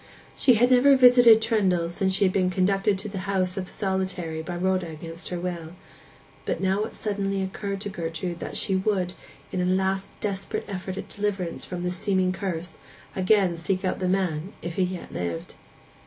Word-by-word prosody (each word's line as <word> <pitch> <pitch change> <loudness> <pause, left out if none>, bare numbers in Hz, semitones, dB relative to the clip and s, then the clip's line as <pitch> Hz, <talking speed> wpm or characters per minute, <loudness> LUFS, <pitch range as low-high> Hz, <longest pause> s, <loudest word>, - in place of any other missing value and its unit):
She 250 - +5
had 245 +3 +4
never 255 +2 +6
revisited 245 -4 +8
Trendle 190 -7 +2
since 190 +2 0
she 200 - +2
had 185 -1 +3
been 185 -2 +2
conducted 195 +2 +2
to 200 +3 -6
the 195 -2 -5
house 185 -2 0
of 190 -2 -4
the - - -15
solitary 185 -5 -2
by 175 +2 -5
Rhoda 185 0 0
against 165 +2 -8
her 180 - -3
will; 170 -2 -5 0.7
but - - -1
it - - -9
now 195 +4 +1
suddenly 195 -2 -2
occurred 195 +1 -4
to 205 - -3
Gertrude 170 -1 -4
that - - -5
she 195 - 0
would, 190 -2 0 0.4
in 185 - -1
a - - +1
last 190 +1 0
desperate 195 -2 -3
effort 190 -1 -5
at - - -5
deliverance 200 -4 -3
from 180 -1 -5
this 180 0 -2
seeming 190 -2 +1
curse, 180 -3 -4 0.4
again 190 -2 +3
seek 185 +4 -1
out 185 - -1
the 185 - 0
man, 185 -1 -1
if 170 - -4
he - - +2
yet 180 -1 -6
lived. 85 -2 -4
190 Hz, 190 wpm, -26 LUFS, 180-200 Hz, 0.7 s, revisited